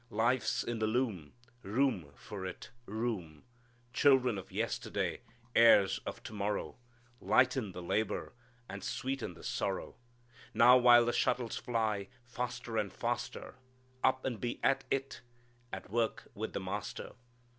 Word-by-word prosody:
Life's 120 Hz, +4 st, +1 dB
in 120 Hz, -1 st, -3 dB
the 110 Hz, -, +1 dB
loom, 110 Hz, -, -1 dB, 0.3 s
Room 105 Hz, -, 0 dB
for 100 Hz, -3 st, -8 dB
it 95 Hz, -1 st, -7 dB, 0.2 s
room! 100 Hz, -8 st, -3 dB, 0.5 s
"Children 130 Hz, -5 st, +4 dB
of 95 Hz, -, -11 dB
yesterday, -, -, -2 dB, 0.3 s
Heirs 105 Hz, -4 st, +6 dB
of -, -, -6 dB
to -, -, -8 dB
morrow, 105 Hz, +3 st, -2 dB, 0.4 s
Lighten 125 Hz, -5 st, +2 dB
the 90 Hz, -, -7 dB
labor 100 Hz, +5 st, -1 dB, 0.3 s
And 100 Hz, 0 st, -7 dB
sweeten 135 Hz, 0 st, -3 dB
the -, -, -14 dB
sorrow: -, -, -3 dB, 0.6 s
Now 120 Hz, +2 st, +8 dB
while 120 Hz, -1 st, +7 dB
the 120 Hz, -, 0 dB
shuttles 120 Hz, -3 st, 0 dB
fly 110 Hz, -4 st, -1 dB, 0.2 s
Faster 120 Hz, -1 st, -4 dB
and 105 Hz, -3 st, 0 dB
faster, -, -, -4 dB, 0.5 s
Up 130 Hz, 0 st, +2 dB
and 120 Hz, -6 st, -2 dB
be 120 Hz, -1 st, -2 dB
at 135 Hz, -, +2 dB
it 135 Hz, -2 st, -2 dB, 0.5 s
At 95 Hz, 0 st, -7 dB
work 115 Hz, 0 st, -1 dB
with 110 Hz, +2 st, -5 dB
the -, -, -2 dB
Master. 95 Hz, +2 st, -5 dB
115 Hz, 135 wpm, -33 LUFS, 100-125 Hz, 0.6 s, Now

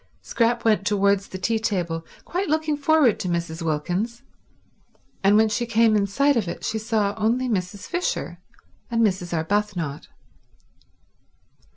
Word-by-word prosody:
Scrap 235 Hz, 0 st, 0 dB
went 215 Hz, -3 st, +3 dB
towards 200 Hz, -1 st, +2 dB
the 185 Hz, -, -7 dB
tea 225 Hz, +4 st, 0 dB
table 175 Hz, -7 st, -2 dB, 0.2 s
quite 365 Hz, 0 st, -2 dB
looking 310 Hz, 0 st, +1 dB
forward 290 Hz, -5 st, +3 dB
to -, -, -3 dB
Mrs. 170 Hz, -1 st, -3 dB
Wilkins; 180 Hz, -, -2 dB, 1.0 s
and 200 Hz, +2 st, +5 dB
when 220 Hz, 0 st, +5 dB
she 215 Hz, +3 st, -1 dB
came 225 Hz, -1 st, +3 dB
in 200 Hz, -1 st, +2 dB
sight 280 Hz, +8 st, +2 dB
of 220 Hz, -6 st, 0 dB
it 170 Hz, -, -6 dB
she 220 Hz, -, -1 dB
saw 215 Hz, -2 st, 0 dB
only 235 Hz, +4 st, +1 dB
Mrs. 195 Hz, -3 st, -3 dB
Fisher 355 Hz, 0 st, -3 dB, 0.5 s
and 230 Hz, -1 st, +2 dB
Mrs. 185 Hz, -3 st, -1 dB
Arbuthnot. 170 Hz, -3 st, -2 dB
210 Hz, 145 wpm, -23 LUFS, 185-235 Hz, 1.0 s, and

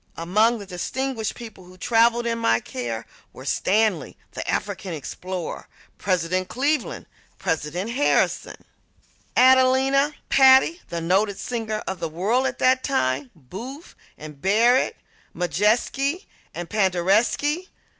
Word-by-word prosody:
Among 215 Hz, +8 st, +2 dB
the 205 Hz, -, -9 dB
distinguished 225 Hz, +5 st, -3 dB
people 220 Hz, -6 st, -11 dB
who 185 Hz, +1 st, -16 dB
traveled 235 Hz, +3 st, +2 dB
in 230 Hz, 0 st, -1 dB
my 115 Hz, -, +2 dB
care 120 Hz, -2 st, -5 dB, 0.3 s
were -, -, -11 dB
Stanley, 205 Hz, -6 st, 0 dB
the -, -, -6 dB
African 190 Hz, -2 st, -3 dB
explorer; 175 Hz, +4 st, -6 dB, 0.3 s
President 185 Hz, -1 st, 0 dB
Cleveland; 280 Hz, +10 st, -1 dB, 0.3 s
President 165 Hz, +7 st, -2 dB
Harrison; 275 Hz, +4 st, 0 dB, 0.7 s
Adelina 260 Hz, +3 st, +4 dB
Patti, 265 Hz, +5 st, +5 dB
the 170 Hz, -1 st, -4 dB
noted 195 Hz, +4 st, +1 dB
singer 220 Hz, -3 st, -4 dB
of 190 Hz, -, -4 dB
the 165 Hz, -, -3 dB
world 215 Hz, +11 st, 0 dB
at 245 Hz, -, -4 dB
that 260 Hz, 0 st, +3 dB
time; 130 Hz, -, 0 dB
Booth 230 Hz, -, -10 dB, 0.2 s
and 150 Hz, -2 st, -11 dB
Barrett; 230 Hz, +7 st, +3 dB, 0.4 s
Modjeski 220 Hz, -, 0 dB, 0.3 s
and 175 Hz, 0 st, -5 dB
Paderewski. 215 Hz, -, +1 dB
215 Hz, 115 wpm, -23 LUFS, 175-255 Hz, 0.7 s, Patti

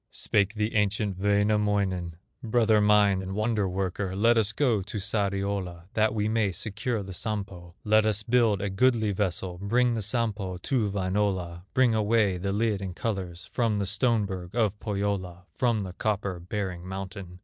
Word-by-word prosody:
Spake 100 Hz, +1 st, 0 dB
the 105 Hz, +1 st, -1 dB
ancient 105 Hz, -2 st, 0 dB
Wainamoinen: 100 Hz, -3 st, +1 dB, 0.3 s
"Brother 110 Hz, -3 st, +3 dB
mine, 105 Hz, -2 st, +4 dB
and 95 Hz, +1 st, -5 dB
wonder 110 Hz, -2 st, 0 dB
worker, 95 Hz, 0 st, -2 dB
Let 115 Hz, +4 st, +4 dB
us 110 Hz, -2 st, +2 dB
go 115 Hz, -4 st, +1 dB
to 105 Hz, +3 st, -6 dB
Sariola, 100 Hz, -4 st, -2 dB
That 110 Hz, 0 st, +2 dB
we 105 Hz, -1 st, 0 dB
may 110 Hz, -2 st, +1 dB
secure 110 Hz, +3 st, -2 dB
the 95 Hz, 0 st, -8 dB
Sampo; 95 Hz, -4 st, -5 dB
Let 110 Hz, 0 st, +4 dB
us 105 Hz, -1 st, 0 dB
build 115 Hz, -4 st, +2 dB
a 100 Hz, -, -2 dB
goodly 110 Hz, +1 st, +2 dB
vessel, 95 Hz, -2 st, -2 dB
Bring 120 Hz, +4 st, +2 dB
the 115 Hz, -, -2 dB
Sampo 105 Hz, -4 st, -1 dB
to 110 Hz, +3 st, 0 dB
Wainola, 95 Hz, -3 st, -1 dB
Bring 130 Hz, -3 st, +4 dB
away 105 Hz, -3 st, +2 dB
the 100 Hz, +2 st, -2 dB
lid 105 Hz, -1 st, 0 dB
in 95 Hz, -2 st, -5 dB
colors, 95 Hz, -6 st, -4 dB
From 115 Hz, -4 st, +1 dB
the 100 Hz, -, -1 dB
stone 105 Hz, +3 st, +1 dB
berg 95 Hz, 0 st, -6 dB
of 105 Hz, -3 st, +1 dB
Pohyola, 100 Hz, -4 st, -3 dB
From 120 Hz, -4 st, +1 dB
the 95 Hz, -2 st, -6 dB
copper 100 Hz, -3 st, -2 dB
bearing 90 Hz, -1 st, -4 dB
mountain. 95 Hz, -1 st, -7 dB
100 Hz, 165 wpm, -27 LUFS, 95-110 Hz, 0.3 s, mine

